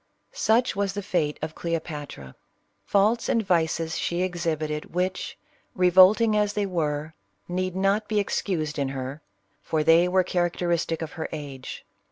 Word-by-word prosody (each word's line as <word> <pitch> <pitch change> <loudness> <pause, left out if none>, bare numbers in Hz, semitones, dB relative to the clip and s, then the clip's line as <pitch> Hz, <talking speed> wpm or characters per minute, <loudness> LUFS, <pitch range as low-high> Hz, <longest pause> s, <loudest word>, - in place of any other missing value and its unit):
Such 240 - +2
was 200 -1 -1
the 205 0 -4
fate 165 -6 0
of 155 0 -3
Cleopatra. 150 - -5 0.6
^Faults 210 +4 +3
and 225 -2 +1
vices 165 -2 0
she 175 +1 -1
exhibited, 160 -4 -3
which, 185 +1 -2 0.4
revolting 190 +5 +6
as 210 -1 +1
they 205 -1 0
were, 155 -4 -2 0.3
need 185 +1 -2
not 195 +3 +1
be 215 -1 +1
excused 160 -7 -2
in 140 -1 0
her, 135 +2 -5 0.4
for 155 -1 -1
they 165 +2 +5
were 185 +1 +3
characteristic 175 -2 -1
of 155 - -6
her 160 - -5
age. 140 -4 -7
175 Hz, 145 wpm, -25 LUFS, 155-195 Hz, 0.6 s, revolting